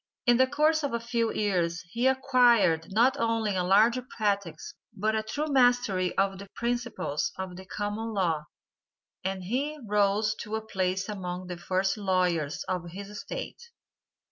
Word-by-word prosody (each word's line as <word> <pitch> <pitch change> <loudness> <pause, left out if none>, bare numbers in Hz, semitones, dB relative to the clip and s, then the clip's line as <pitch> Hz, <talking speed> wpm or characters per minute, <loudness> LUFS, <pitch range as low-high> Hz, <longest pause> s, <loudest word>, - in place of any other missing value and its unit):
In 240 -1 +5
the 260 +1 +5
course 305 +3 +2
of 285 -4 -2
a - - -1
few 230 -1 -1
years 175 -5 0
he 240 +5 +1
acquired 240 -11 +4
not 235 +6 +3
only 225 -3 0
a 180 - +1
large 215 +7 +4
practice 200 -7 -2 0.2
but 215 +3 -1
a 220 - +1
thorough 220 +8 -3
mastery 245 -8 +3
of 195 -1 +1
the 200 - -9
principles 235 - -2
of 190 -1 -5
the 190 +1 -10
common 210 +3 -3
law, 170 -7 0 0.8
and 190 0 -3
he 275 +10 -2
rose 210 +1 +2
to 210 +1 -4
a 220 0 -4
place 190 -2 -1
among 185 -3 -5
the 180 -1 -6
first 190 +3 0
lawyers 180 -7 0
of 180 -2 -3
his 200 +3 -8
State. - - -6
205 Hz, 160 wpm, -28 LUFS, 185-235 Hz, 0.8 s, In